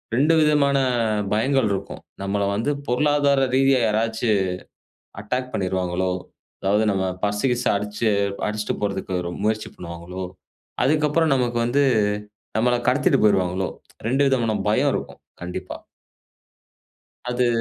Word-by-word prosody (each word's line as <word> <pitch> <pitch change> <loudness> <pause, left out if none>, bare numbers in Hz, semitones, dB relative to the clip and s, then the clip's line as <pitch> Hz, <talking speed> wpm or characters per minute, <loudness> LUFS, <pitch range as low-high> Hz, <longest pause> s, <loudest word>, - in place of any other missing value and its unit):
2 150 +6 +4
விதமான 145 -2 +3 0.6
பயங்கள் 130 0 +2
இருக்கும். 95 0 -5 0.2
நம்மள 100 +1 -1
வந்து 115 +8 0 0.2
பொருளாதார 140 +1 +3
ரீதியா 135 -1 +4
யாராச்சும் 110 -1 +1 0.8
அட்டாக் 125 +4 -3
பண்ணிருவாங்களோ! 95 -1 -1 0.5
அதாவது 105 +3 +2
நம்ம 95 -1 0 0.2
பர்ஸ் 105 +3 -1
கீஸ்ஸூ 125 0 0
அடிச்சு 105 +2 -2 0.4
அடிச்சுட்டு 105 0 -2
போறதுக்கு 100 -2 -2
ரொ 85 - -4
முயற்சி 110 0 -1
பண்ணுவாங்களோ! 85 +2 -7 0.6
அதுக்கு 150 +2 +3
அப்புறம் 160 -1 +2
நமக்கு 120 -2 0
வந்து 140 +4 +2 0.7
நம்மள 120 +2 +3
கடத்திட்டு 145 +3 +3
போயிருவாங்களோ! 95 -2 +2 0.4
ரெண்டு 135 +3 +3
விதமான 115 -5 +1
பயம் - - +3
இருக்கும். - - -5 0.2
கண்டிப்பா 90 0 -5 1.5
அது. 125 0 0
115 Hz, 115 wpm, -23 LUFS, 100-135 Hz, 1.5 s, 2